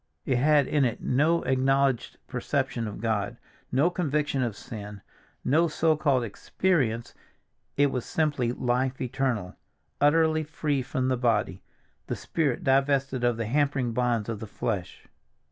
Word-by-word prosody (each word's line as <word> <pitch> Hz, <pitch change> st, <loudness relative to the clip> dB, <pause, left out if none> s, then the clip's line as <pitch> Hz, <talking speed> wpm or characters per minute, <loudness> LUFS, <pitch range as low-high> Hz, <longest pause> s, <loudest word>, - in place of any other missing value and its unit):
It 130 Hz, -, +1 dB
had 145 Hz, +1 st, +4 dB
in 145 Hz, +1 st, +1 dB
it 120 Hz, -3 st, -1 dB
no 155 Hz, +6 st, +2 dB
acknowledged 135 Hz, -1 st, +1 dB
perception 135 Hz, -4 st, -2 dB
of 105 Hz, -, -7 dB
God, 110 Hz, -3 st, -1 dB, 0.3 s
no 145 Hz, +8 st, +3 dB
conviction 150 Hz, -5 st, 0 dB
of 120 Hz, -5 st, -1 dB
sin, 105 Hz, -2 st, -8 dB, 0.4 s
no 165 Hz, +5 st, +4 dB
so 160 Hz, 0 st, +2 dB
called 140 Hz, -5 st, +2 dB
"experience"; 120 Hz, -, -1 dB, 0.6 s
it 145 Hz, -1 st, +4 dB
was 125 Hz, -2 st, -2 dB
simply 145 Hz, -7 st, 0 dB
life 125 Hz, +1 st, -1 dB
eternal, 125 Hz, -7 st, -2 dB, 0.4 s
utterly 155 Hz, +1 st, +4 dB
free 150 Hz, -2 st, -1 dB
from 130 Hz, 0 st, -1 dB
the 130 Hz, -, +1 dB
body, 115 Hz, -4 st, 0 dB, 0.5 s
the -, -, -2 dB
spirit 150 Hz, -7 st, -1 dB
divested 135 Hz, -1 st, +2 dB
of 120 Hz, -2 st, +2 dB
the 115 Hz, -, -2 dB
hampering 135 Hz, 0 st, +1 dB
bonds 120 Hz, -2 st, 0 dB
of 115 Hz, -3 st, -4 dB
the 110 Hz, -, -7 dB
flesh. 100 Hz, -3 st, -4 dB
130 Hz, 145 wpm, -27 LUFS, 120-145 Hz, 0.6 s, had